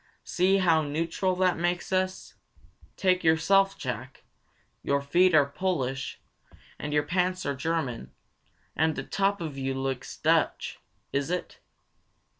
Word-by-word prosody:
See 185 +2 +2
how 170 -4 +4
neutral 165 +5 -1
that 180 -2 +2
makes 175 +1 -1
us! 185 0 -1 0.6
Take 185 -1 +2
yourself, 195 +5 +3
Jack. 130 0 -6 0.6
Your 140 0 +1
feet 175 +5 +3
are 145 -2 +6
Polish, 140 -4 -2 0.6
and 150 - -4
your 150 0 +2
pants 180 +3 0
are 140 - 0
German, 140 - -3 0.6
and 160 0 +2
the - - -4
top 200 -1 0
of 150 -4 -5
you 135 0 -2
looks 135 -1 -4
Dutch. - - +1 0.3
Is 140 +2 0
it?" 180 0 -4
165 Hz, 130 wpm, -27 LUFS, 140-185 Hz, 0.6 s, are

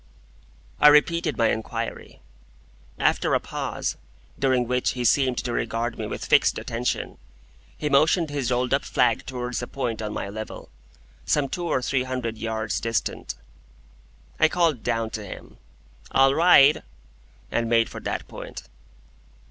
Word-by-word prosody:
I 150 - +7
repeated 150 0 +4
my 115 -1 +3
inquiry. 110 - -5 0.8
After - - +2
a - - +3
pause, - - -4 0.4
during 130 -2 +2
which 125 0 0
he 125 -1 -3
seemed 130 +1 +3
to 120 - -2
regard 115 0 -2
me 110 - -3
with - - -5
fixed - - +4
attention, 120 +2 -3 0.6
he 150 - -2
motioned 155 +4 +3
with - - -6
his 135 -3 -1
rolled 125 0 0
up - - +2
flag - - +1
towards 125 -2 -3
a 120 - -5
point 120 -5 -3
on 105 -1 -3
my - - -4
level, 110 +2 -7 0.5
some 145 -2 +1
two 175 +5 -4
or 130 - 0
three 130 +1 +1
hundred 125 -3 -4
yards 110 -1 -2
distant. 115 0 -2 1.0
I 160 - +5
called 165 -8 +1
down 115 0 -1
to 110 - -5
him, 100 - -10 0.5
"All 135 0 +4
right!" 155 -3 +6 0.7
and 115 -1 0
made 115 -1 +3
for - - -8
that - - -4
point. - - -9
125 Hz, 150 wpm, -24 LUFS, 115-140 Hz, 1.0 s, I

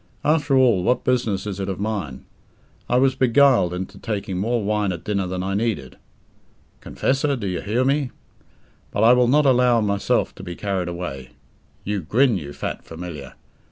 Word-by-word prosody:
After 145 -3 +2
all, 120 -8 +4
what 125 +6 +1
business 115 -6 0
is 100 -2 -5
it 95 0 -3
of 95 - -4
mine? 100 -11 -4 0.6
I 125 - +3
was 135 +1 +3
beguiled 130 -6 +4
into 90 +1 -6
taking 100 -4 -3
more 115 +2 0
wine 105 -1 0
at 85 -2 -6
dinner 100 -3 -1
than 90 0 -3
I 95 +1 -2
needed. 100 - -2 0.8
Confessor, 140 +2 0
do 115 -6 -5
you 90 -2 -2
hear 115 +5 0
me? 140 -1 +1 0.8
But 105 - -1
I 115 +2 +7
will 125 -1 +4
not 145 +4 +4
allow 125 -2 +4
myself 100 -2 0
to - - -11
be 90 -2 -6
carried 95 -3 -2
away. 85 -7 -6 0.5
You 105 -1 -2
grin, 120 - +2
you 70 -3 -8
fat - - -5
Familiar! 80 -5 -8
105 Hz, 175 wpm, -22 LUFS, 90-125 Hz, 0.8 s, I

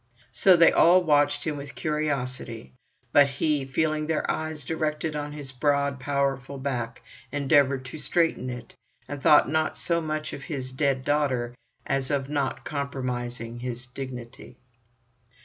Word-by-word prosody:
So 185 +8 +5
they 165 - +7
all 180 +2 +6
watched 145 -2 +2
him 155 -3 -2
with 140 0 -8
curiosity, 135 -7 -3 0.4
but 145 -1 +7
he, 140 +1 0
feeling 155 +3 0
their 160 -1 0
eyes 155 -3 -4
directed 155 0 -2
on 145 0 -3
his 145 -2 -7
broad 140 +1 +1
powerful 140 0 -1
back, 125 -4 -3 0.3
endeavoured 140 -2 +3
to 130 +5 -8
straighten 165 -6 0
it, 120 -2 -8 0.3
and 145 -1 -6
thought 150 - +6
not 155 +2 0
so 170 -1 +1
much 155 -1 -3
of 140 - -7
his 130 -4 -4
dead 135 -1 0
daughter 130 -5 +1 0.3
as 135 -1 0
of 140 -2 -1
not 140 -2 -2
compromising 125 -5 -3
his 125 0 -5
dignity. 125 -1 -8
140 Hz, 145 wpm, -26 LUFS, 130-150 Hz, 0.4 s, they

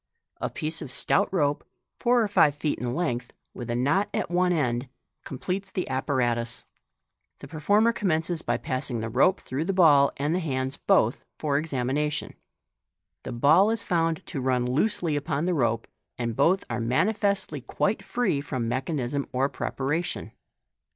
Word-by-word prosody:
A - - -2
piece 155 +1 -4
of 130 - -7
stout 200 - +2
rope, 145 -6 +1 0.4
four 240 -1 +3
or - - 0
five 155 -8 +4
feet 150 0 -2
in 125 0 -2
length, 125 -8 -2 0.2
with 120 -1 -7
a 120 - 0
knot 145 +12 +1
at - - -2
one 180 +1 +2
end, 125 -6 0 0.4
com 135 - -6
pletes 190 +6 -3
the 185 - -2
apparatus. 120 -3 -1 0.7
The 140 - -11
performer 205 +10 +2
commences 170 -6 0
by - - 0
passing 130 -2 -3
the 110 0 -3
rope 160 - +3
through 140 +5 -3
the 195 - 0
ball, 150 -7 +6
and 145 +4 0
hands 135 -6 -2
both - - +2
for 145 -2 -1
examination. 150 0 -2 0.9
The - - -6
ball 155 - +5
is 225 -1 -1
found 165 -2 0
to 135 - -4
run 125 -1 +1
loosely 155 - +1
upon 145 +2 -1
the 180 - +1
rope, 115 -6 +1 0.3
and 115 -2 -2
both 170 +9 +3
are 120 0 -3
manifestly 190 - 0
quite 200 - -1
free 240 -13 0
from 130 -4 -3
mechanism 135 +1 -2
or 135 +2 +1
preparation. 150 +7 -3
145 Hz, 160 wpm, -26 LUFS, 130-180 Hz, 0.9 s, ball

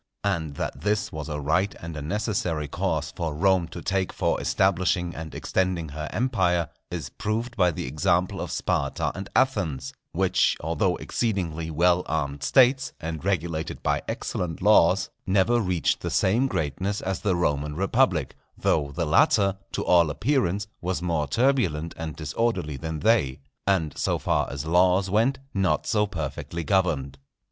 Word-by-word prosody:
And 80 -8 -1
that - - -4
this 105 0 0
was 80 0 -6
a 75 -1 -3
right 90 +8 +1
and 85 -1 -7
a 75 - -5
necessary 85 -3 -1
course - - -2
for 80 -3 -3
Rome 95 +1 +3
to 85 +1 -9
take 95 0 0
for - - 0
establishing 90 -2 +1
and 80 -1 -7
extending 90 -4 -1
her 75 +1 -5
empire, 95 -9 +1 0.2
is 85 -6 -5
proved 115 +3 -3
by 90 -4 +4
the 80 - -4
example 75 +7 0
of - - -4
Sparta - - -1
and 95 0 -7
Athens, 100 - +1 0.2
which, - - +2
although 85 +3 0
exceedingly 85 -8 -2
well 85 +3 +3
armed 70 -2 -2
States, 130 - +4
and 80 -1 -5
regulated 85 -4 -2
by - - +1
excellent 80 -3 -3
laws, - - +4 0.2
never 100 +5 +3
reached 90 -5 0
the - - -3
same 115 +8 +2
greatness 95 - -2
as 95 -1 -2
the 100 -4 +1
Roman 75 -3 0
Republic; 95 - +1 0.2
though 70 -2 +1
the 85 +4 -2
latter, 95 +5 +3 0.2
to - - -2
all 85 -3 +5
appearance, 100 - 0 0.2
was 90 0 -2
more 80 -4 0
turbulent 85 - +1
and 80 -2 -5
disorderly 75 0 -1
than 80 +3 -5
they, 75 - +2 0.3
and, 85 -7 +1
so - - 0
far - - 0
as 70 +2 -5
laws 90 +3 +3
went, 115 +6 +2 0.2
not 95 -2 +1
so 105 -2 +2
perfectly 85 -1 -4
governed. 75 -8 0
90 Hz, 155 wpm, -25 LUFS, 80-100 Hz, 0.3 s, all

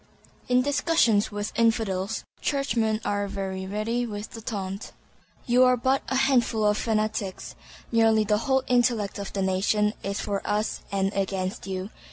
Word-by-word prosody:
In 250 0 +4
discussions 285 -8 +2
with 205 0 -3
"Infidels," 220 -3 +1 0.2
Churchmen 235 -7 0
are 205 0 0
very 190 -1 -4
ready 225 +4 -1
with 210 -1 -6
the 225 - -8
taunt, 200 -2 -5 0.5
"You 250 +1 +5
are 250 0 +5
but 260 +3 +1
a 265 - 0
handful 250 -5 +2
of' 210 0 +3
fanatics. 215 -3 -2 0.4
Nearly 225 -1 +4
the 210 0 +1
whole 265 +1 +1
intellect 235 -5 +1
of 200 - -5
the 195 - -1
nation 210 +3 +1
is 200 +1 -3
for 200 -1 -2
us 210 +1 -1
and 195 0 0
against 195 -1 -2
you." 190 +2 -4
215 Hz, 155 wpm, -26 LUFS, 200-240 Hz, 0.5 s, You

